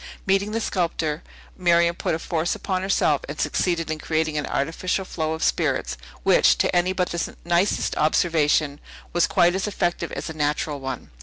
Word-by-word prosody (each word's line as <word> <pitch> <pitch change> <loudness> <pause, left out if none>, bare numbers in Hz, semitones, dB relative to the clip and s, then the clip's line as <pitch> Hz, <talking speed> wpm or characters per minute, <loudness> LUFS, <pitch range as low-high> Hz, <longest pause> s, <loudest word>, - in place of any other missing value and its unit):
Meeting 195 +1 +2
the 225 - -1
sculptor, 165 -6 -1 0.3
Miriam 170 -2 +3
put 160 - -1
a - - -2
force 165 0 -1
upon 185 -2 -2
herself 185 -6 +2
and 150 - -6
succeeded 170 -3 0
in 155 - -3
creating 155 0 -1
an 150 -2 -1
artificial 180 +6 -1
flow 160 -3 -2
of 160 - -4
spirits, 65 +1 0 0.3
which, - - +5
to - - +1
any 175 +1 +3
but 185 -1 -1
the 170 - -3
nicest 175 +3 +1
observation, 155 -2 +2 0.3
was 175 0 +3
quite 175 0 +3
as 190 +2 -1
effective 175 -4 -1
as - - -4
a 160 - -5
natural 150 -1 -1
one. 130 -2 -6
170 Hz, 175 wpm, -23 LUFS, 155-180 Hz, 0.3 s, which